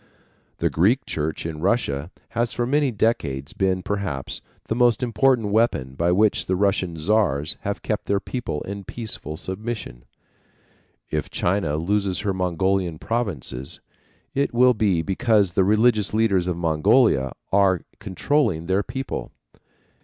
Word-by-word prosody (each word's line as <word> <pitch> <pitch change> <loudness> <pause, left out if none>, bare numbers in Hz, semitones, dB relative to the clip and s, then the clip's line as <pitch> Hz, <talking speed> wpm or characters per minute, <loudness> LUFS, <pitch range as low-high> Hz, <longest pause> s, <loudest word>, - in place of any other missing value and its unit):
The - - 0
Greek 105 +11 +2
church 80 +1 -3
in 80 -2 -4
Russia 85 - 0 0.2
has 120 0 -1
for 120 - -1
many 145 +2 +2
decades 80 - -1
been, 95 -1 0
perhaps, 95 -9 -3 0.3
the - - 0
most 120 +1 +3
important 120 -1 +2
weapon 100 - +1
by 85 +5 +1
which 105 +3 +2
the 95 - +1
Russian 95 -3 0
Czars 80 -5 +1
have 100 -1 -4
kept 105 - -2
their 100 0 +2
people 120 - -4
in 100 +1 -6
peaceful 95 -8 -5
submission. 95 - -5 1.1
If - - -2
China 85 -5 0
loses 95 +3 0
her 100 -2 -1
Mongolian 90 -1 0
provinces, 85 - -3 0.5
it 140 -3 0
will 125 +1 +6
be 100 -7 +1
because 100 0 +2
the 95 - +3
religious 110 +1 +3
leaders 100 -5 +2
of 90 -2 -1
Mongolia 80 - +3 0.2
are 95 -3 +4 0.2
controlling 100 - 0
their 95 +3 +1
people. 135 +4 -5
100 Hz, 140 wpm, -23 LUFS, 85-115 Hz, 1.1 s, will